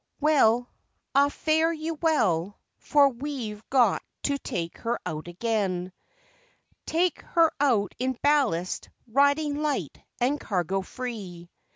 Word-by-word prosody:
Well, 245 -6 +4 0.5
ah 280 +1 +5
fare 320 +2 +1
you 325 0 -3
well, 210 - +1 0.2
for 285 -1 +4
we've 240 -5 -5
got 245 -7 +3 0.2
to 280 -1 0
take 170 -8 -4
her 235 +1 -2
out 155 -2 -5
again 185 -2 -2 0.9
Take 345 +1 +1
her 330 -2 +3
out 230 -9 +2
in 260 +1 0
ballast, 260 - +1 0.2
riding 285 +4 +2
light 300 -2 -2 0.2
and 265 +4 +1
cargo 190 0 -1
free. 190 -7 -7
250 Hz, 115 wpm, -26 LUFS, 195-290 Hz, 0.9 s, ah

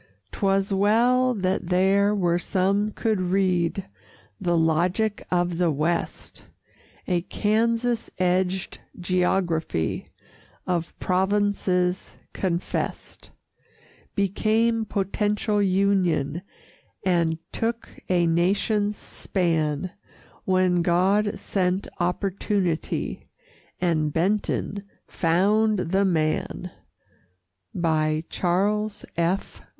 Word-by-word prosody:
'Twas 195 0 +1
well 240 +6 +3
that 185 -3 -1
there 195 +3 +3
were 175 -3 +1
some 195 +3 +1
could 215 -2 -1
read 185 -1 +1 0.5
The 175 -1 +1
logic 175 +7 +1
of 175 -1 0
the 175 -2 +3
West! 155 +3 -2 0.6
A 180 -2 +1
Kansas 230 +4 0
edged 185 0 0 0.2
geography, 175 - 0 0.6
Of 175 -2 -2
provinces 190 -1 0 0.2
confessed, 180 -2 -3 0.9
Became 220 +3 +1
potential 205 +1 0
Union 185 -6 +1 0.6
And 170 -3 +2
took 230 0 -2 0.2
a 175 -2 +3
Nation's 205 +5 +1
span 165 -2 -1 0.5
When 185 -2 +2
God 190 +5 +2
sent 185 0 -1
Opportunity 180 -1 -1 0.5
And 155 -4 +1
Benton 200 +3 -1 0.2
found 205 +6 +2
the 190 +2 +1
Man! 170 +1 -1 1.6
CHARLES 205 +4 0
F. 170 +4 -1
185 Hz, 80 wpm, -25 LUFS, 175-205 Hz, 1.6 s, well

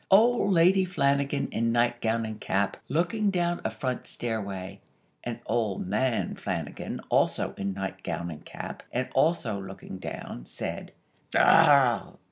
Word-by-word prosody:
Old 220 +1 +5
Lady 185 +2 +5
Flanagan 140 -5 +1
in 115 +1 +1
nightgown 120 -1 +1
and 110 -1 -6
cap, 95 +1 0
looking 180 - +1
down 175 -2 0
a - - 0
front 130 -3 -4
stairway, 100 -4 -4 0.4
(and 120 -1 -4
Old 110 -5 -1
Man 115 +6 0
Flanagan, - - -4
also - - +2
in 95 -1 -3
nightgown 95 -3 -4
and 75 - -9
cap, - - -7
and 125 +1 -1
also 135 - +2
looking 95 -1 -8
down), - - -7
said: - - -5 0.4
"Arrah!! 130 -8 +5
120 Hz, 130 wpm, -28 LUFS, 100-165 Hz, 0.4 s, Old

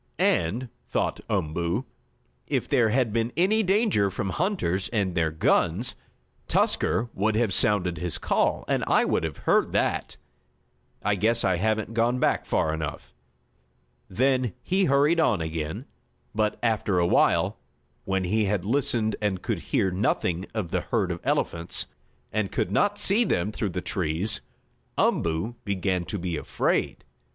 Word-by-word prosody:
"And," 110 +10 +1 0.2
thought - - -1
Umboo, 85 - -1 0.6
"if - - -1
there 120 -5 +3
had 120 -2 +1
been 115 +1 0
any 200 +6 +3
danger 195 - +2
from 95 0 -3
hunters 155 - -1
and 100 -6 0
their 85 -2 +1
guns, 85 +7 +1 0.5
Tusker 115 0 +1
would 105 +3 0
have 110 -4 +1
sounded 90 -7 +2
his 90 -1 -3
call, - - 0
and - - 0
I - - +4
would - - 0
have 80 -3 -3
heard - - +3
that. - - 0 0.9
I 105 - +2
guess 110 +4 +1
I 95 -2 +2
haven't 110 +3 -1
gone 115 +2 +2
back - - +1
far 80 - +1
enough." 80 -2 -5 1.0
Then 130 +1 +1
he 190 +1 +2
hurried 145 +4 +3
on 120 - +3
again, 80 -1 -4 0.5
but, 105 0 0
after 110 -4 +1
awhile, 85 0 +2 0.4
when 95 -1 -1
he 105 +4 +1
had 100 -2 -1
listened 115 -2 +1
and 100 -3 -1
could - - -1
hear 95 - 0
nothing 90 -1 0
of 100 -7 -3
the - - 0
herd - - -1
of - - -4
elephants, 85 +1 -1 0.5
and 105 -2 -1
could 90 - -1
not 205 - +2
see 205 +3 +5
them 100 - 0
through 105 -1 -2
the 90 0 -4
trees, 90 +3 0 0.6
Umboo 85 +9 0
began 95 -3 -1
to 105 - -4
be 85 -3 -3
afraid. - - -1
105 Hz, 150 wpm, -26 LUFS, 90-120 Hz, 1.0 s, see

